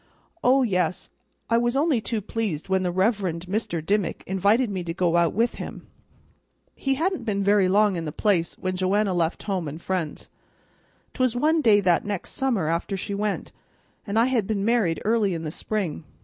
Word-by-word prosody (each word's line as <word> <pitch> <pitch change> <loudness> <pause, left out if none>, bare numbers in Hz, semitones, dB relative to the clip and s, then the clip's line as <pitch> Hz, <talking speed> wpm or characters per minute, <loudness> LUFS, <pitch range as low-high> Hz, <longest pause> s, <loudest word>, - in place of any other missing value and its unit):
"Oh 260 +2 +5
yes, 185 -5 -1 0.4
I 230 0 +3
was 240 +2 0
only 285 -5 +2
too 215 +1 -2
pleased 200 -6 -3
when 190 0 +2
the 180 -1 0
Reverend 185 -3 0
Mr. 185 -4 -2
Dimmick 200 0 0
invited 200 +6 +2
me 190 -4 -3
to 165 0 -4
go 175 -2 +1
out 170 -1 +3
with 230 +4 0
him. - - -8 0.9
He 270 -1 -1
hadn't 345 0 -1
been 200 -3 -1
very 200 -2 +4
long 205 -1 +3
in 165 - -4
the 150 - -3
place 175 -1 0
when 185 0 -2
Joanna 190 +2 +1
left 170 -1 -1
home 185 -6 -2
and 150 +3 -6
friends. 175 -4 -3 0.9
'Twas 255 -3 +1
one 310 +5 +2
day 215 -6 +5
that 180 -3 +3
next 205 -3 -4
summer 240 - 0
after 170 +4 -1
she 200 +2 -4
went, 205 0 -2 0.6
and 200 +2 -1
I 230 - +5
had 245 -6 0
been 205 -2 -1
married 220 -8 +2
early 215 -4 +2
in 165 - -5
the 155 - -4
spring. 190 -4 -3
200 Hz, 190 wpm, -25 LUFS, 180-230 Hz, 0.9 s, Oh